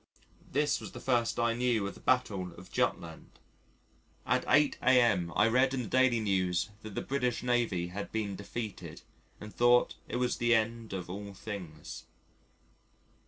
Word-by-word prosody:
This 145 +2 +1
was - - -8
the - - -7
first 120 -3 +1
I 120 0 +2
knew 120 -3 +1
of 100 - -4
the - - -14
Battle 100 -9 0
of - - -13
Jutland. 80 -1 -2 1.0
At - - +1
8 145 -1 +3
a.m. 115 -9 +4
I 105 - +4
read 130 +3 +3
in 125 - -2
the - - -6
Daily 130 -2 +3
News 95 -2 0
that 110 -2 -9
the - - -2
British 125 -3 -1
Navy 115 -8 0
had 100 +3 -6
been 105 -3 -2
defeated, 105 +2 -7 0.4
and 105 0 -9
thought 120 0 +4
it - - -5
was 125 0 0
the 120 0 +3
end 115 0 -1
of 90 -2 -4
all 100 +2 -7
things. 90 -8 -8
115 Hz, 165 wpm, -31 LUFS, 100-125 Hz, 1.0 s, a.m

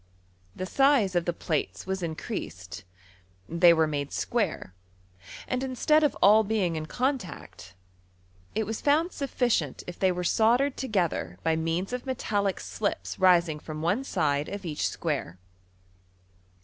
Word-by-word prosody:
The 185 - -4
size 270 -3 +3
of 175 -1 +1
the 175 - +1
plates 160 -3 -3
was 190 0 -3
increased; 155 - -5 0.6
they 170 +1 +5
were 160 -1 +4
made 145 -2 -3
square, 210 - -2 0.7
and 255 0 -1
instead 300 +4 +2
of 295 - +1
all 215 +3 +7
being 200 -5 0
in 155 0 -4
contact, 240 - -4 0.8
it 220 - 0
was 220 +1 -4
found 315 +5 +2
sufficient 240 - -1
if 180 - -8
they 190 -1 +3
were 180 0 -3
st^darcd 240 +9 +3
together 175 - -1
by 160 - +2
means 165 +6 -2
of 250 +1 -4
metallic 205 -6 -1
slips 210 - -3
rising 175 -4 +4
from 155 0 -7
one 205 +10 +1
side 145 - 0
of 200 -1 -6
each 155 -3 -1
square. 140 - -3
185 Hz, 140 wpm, -27 LUFS, 160-235 Hz, 0.8 s, all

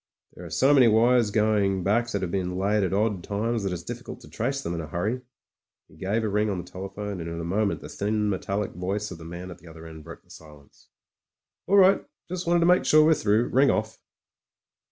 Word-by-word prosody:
"There 90 - -12
are 85 - -8
so 130 - +3
many 130 -4 +6
wires 115 +1 +4
going 105 -3 +1
back 115 +5 +1
that 100 -4 -2
have 85 - -3
been 90 -1 -2
laid 100 +2 +1
at 95 - -1
odd 100 -2 0
times, 110 +4 -2
that 95 -1 -2
it's 85 -1 -5
difficult - - -8
to - - -13
trace 135 +5 -2
them 85 - -3
in 85 - -3
a 80 - -7
hurry." 105 +10 -2 0.7
He - - -20
gave 105 +4 -1
a - - 0
ring 105 +1 0
on 100 - -2
the 90 - -5
telephone, 95 +2 -6
and 85 - -5
in 85 0 -5
a - - -4
moment 100 +4 -1
the - - -8
thin, 105 +1 -1
metallic 100 +1 -2
voice 100 +4 -3
of 85 - -8
the 80 - -10
man 85 +2 -8
at - - -11
the 85 - -17
other 80 0 -12
end 80 -1 -10
broke 85 +2 -11
the - - -22
silence. 75 -3 -16 0.8
"All 200 - +4
right. 195 0 +5 0.2
Just 180 0 -5
wanted 170 0 +3
to - - +3
make 180 +1 +4
sure 155 - +5
we 155 - +5
were - - +6
through. 110 -3 +1
Ring 135 +2 +4
off." 110 0 -1
100 Hz, 240 wpm, -25 LUFS, 90-115 Hz, 0.8 s, many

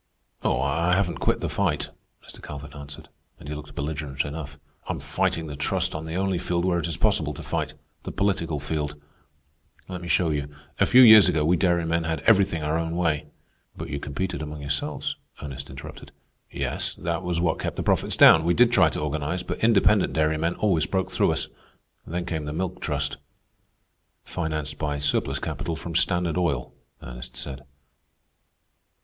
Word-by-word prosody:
"Oh, - - +1
I 80 +6 +1
haven't 95 -3 0
quit - - +1
the - - -1
fight," - - 0 0.4
Mr. - - -12
Calvin 75 0 -8
answered, 70 0 -9 0.3
and - - -11
he 75 - -4
looked 75 -1 -9
belligerent 70 -1 -3
enough. 75 0 -6 0.3
"I'm - - -2
fighting 80 - -1
the 75 -2 -6
Trust 90 +5 0
on 80 0 -5
the 80 +1 -5
only 95 -1 0
field 85 0 -1
where 90 -2 +2
it 85 - -2
is 85 - -3
possible - - +1
to - - -8
fight—the - - -5
political 85 -6 0
field. 75 0 -3 0.9
Let 90 -1 -6
me 85 - -7
show 85 -2 +2
you. 70 -1 -1 0.3
A - - +4
few 130 +1 +8
years 110 -4 +9
ago 75 -1 +1
we 85 +3 +4
dairymen 85 -1 +1
had 80 0 -2
everything 95 -7 +3
our 75 +2 0
own 85 0 -2
way." 75 -4 0 0.5
"But 80 +1 -6
you 70 -2 -3
competed 75 +7 -3
among 75 -1 -6
yourselves?" 70 0 -2 0.2
Ernest 70 -1 -7
interrupted. - - -10 0.4
"Yes, - - -2
that 85 -1 -2
was 90 -1 -1
what 85 -1 +1
kept - - -3
the - - -3
profits - - +1
down. 80 - +8
We 85 +1 +2
did 120 0 +5
try 95 -9 +5
to - - -4
organize, 75 +4 -2
but 90 - -5
independent 105 -3 +4
dairymen 80 +2 +1
always 90 -7 +1
broke 95 -1 -1
through - - +2
us. - - -2 0.6
Then 85 +2 -3
came 80 -3 -3
the 75 - -4
Milk 90 +2 -3
Trust." 75 -2 -2 1.1
"Financed 80 -2 -3
by 75 -2 -1
surplus 70 0 +1
capital 85 - -3
from 85 +1 -7
Standard 85 0 +1
Oil," 70 -8 -1 0.3
Ernest - - -8
said. 65 +1 -7
80 Hz, 180 wpm, -25 LUFS, 75-90 Hz, 1.1 s, years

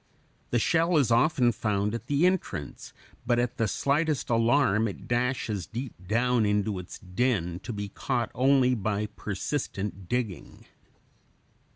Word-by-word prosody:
The 120 - +1
shell 165 +7 +2
is 135 -5 +3
often 125 +1 +4
found 105 -2 -1
at 115 - -5
the 145 +4 +2
entrance, 180 - -2 0.3
but 120 - +1
at 120 0 -1
the 115 -3 +1
slightest 145 - 0
alarm 115 -2 +3
it 100 - -8
dashes 120 -5 -1
deep 120 +1 -5
down 120 +2 +2
into 105 -1 0
its 90 - -9
den, 90 -3 -1
to 105 - -6
be 105 -2 -4
caught 120 +1 -2
only 130 0 +4
by 105 -2 -1
persistent 100 -3 -4
digging. 120 -7 -3
115 Hz, 140 wpm, -27 LUFS, 105-130 Hz, 0.3 s, often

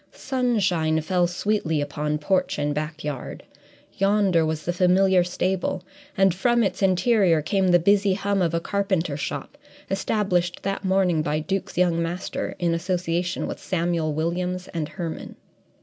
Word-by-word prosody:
Sunshine 195 - 0
fell 175 +2 +1
sweetly 175 -3 -1
upon 150 +1 -2
porch 185 +5 0
and 145 0 0
backyard; 150 -2 -5 0.6
yonder 195 -4 +3
was 155 -1 -2
the 175 - 0
familiar 185 +1 +4
stable, 180 +1 -2 0.3
and 195 -2 +4
from 240 +5 +2
its 190 -1 -2
interior 190 -2 +3
came 190 +4 +1
the 175 -1 +6
busy 200 +2 +3
hum 200 0 0
of 170 -2 +1
a - - +2
carpenter 190 -5 -1
shop, 255 - -5 0.3
established 190 -3 0
that 195 +1 -2
morning 190 -4 +2
by 150 0 -1
Duke's 190 +4 -3
young 175 -2 +2
master, 170 +2 -3
in 170 -2 0
association 175 +1 -1
with - - -5
Samuel 170 -3 -1
Williams 180 +4 -2
and 160 -3 -3
Herman. 170 -4 -6
180 Hz, 145 wpm, -24 LUFS, 165-195 Hz, 0.6 s, the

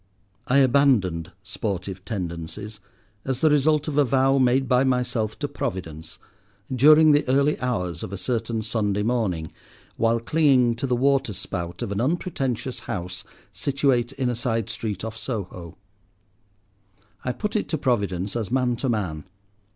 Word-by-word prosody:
I 130 - +3
abandoned 120 - +3
sportive 95 -2 -4
tendencies 100 +1 -5 0.4
as 130 -1 -3
the 155 - +5
result 150 +1 +3
of 150 -1 0
a - - +6
vow 135 +1 +3
made 130 +1 +3
by 125 +1 +4
myself 125 -4 0
to 145 - -2
Providence, 90 - -5 0.6
during 155 +4 +7
the 145 0 +4
early 140 +3 +2
hours 90 -10 -2
of - - -6
a 100 - -4
certain 115 0 -2
Sunday 105 -2 -1
morning, 100 -9 -1 0.5
while 115 0 +2
clinging 130 -2 +3
to 135 - -2
the 125 - +1
waterspout 100 -10 -1
of - - -4
an 100 +2 -1
unpretentious 135 -4 -2
house 90 +2 -4 0.3
situate 135 -3 +1
in 135 -2 -1
a 120 - 0
side 115 -2 -1
street 105 -2 -4
off 110 0 -5
Soho. 100 - -6 1.5
I 125 - -1
put 210 - -4
it 215 - -1
to 160 - 0
Providence 100 - -1
as 110 -5 -2
man 125 -1 +1
to 130 - -2
man. 90 -10 -2
120 Hz, 150 wpm, -24 LUFS, 100-135 Hz, 1.5 s, during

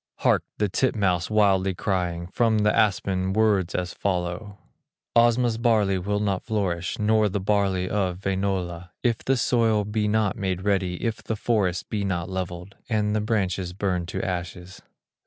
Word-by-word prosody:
Hark! - - +3
the 105 - +1
titmouse 95 -5 +1
wildly 95 -3 +3
crying, 90 -3 -1
From 110 +4 +1
the 105 0 +2
aspen, 95 -2 +1
words 105 -4 +2
as 90 -1 -2
follow: 95 +2 -3 0.6
"Osma's 120 -1 +3
barley 105 -5 +2
will 105 +3 -1
not 100 -3 0
flourish, 95 -6 -2
Not 105 -1 +2
the 100 - 0
barley 95 -2 +1
of 95 -2 -1
Wainola, 95 -3 -2
If 120 -3 +1
the 135 0 0
soil 115 -4 +2
be 105 0 -1
not 105 -1 +1
made 95 -3 -2
ready, 95 -3 +1
If 115 -1 -2
the 110 - -2
forest 105 -6 0
be 105 -2 -1
not 90 -2 -2
levelled, 90 0 -5
And 105 -2 +1
the 110 - +1
branches 95 -4 -1
burned 90 -3 -1
to - - -4
ashes." 90 +1 -5
100 Hz, 155 wpm, -25 LUFS, 90-110 Hz, 0.6 s, Hark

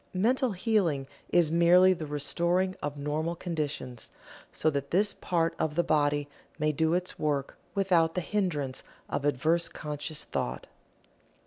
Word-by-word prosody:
Mental 245 +4 +2
Healing 180 - +1 0.2
is 170 -3 +3
merely 175 +2 +6
the 165 -4 -6
restoring 170 +6 0
of 145 0 -4
normal 155 +4 -2
conditions, 150 -8 -4 0.4
so 155 - +1
that 140 -1 -3
this 200 +3 +2
part 165 -2 0
of 155 -1 -1
the 175 - +3
body 145 -2 +1 0.3
may 155 -1 +1
do 160 +3 +1
its 180 0 -2
work 145 -2 -1 0.2
without 175 -5 +3
the 180 - 0
hindrance 165 -10 -1 0.3
of 140 - -2
adverse 155 +5 +2
conscious 150 +1 -5
thought. 60 +1 -3
160 Hz, 140 wpm, -29 LUFS, 145-180 Hz, 0.4 s, merely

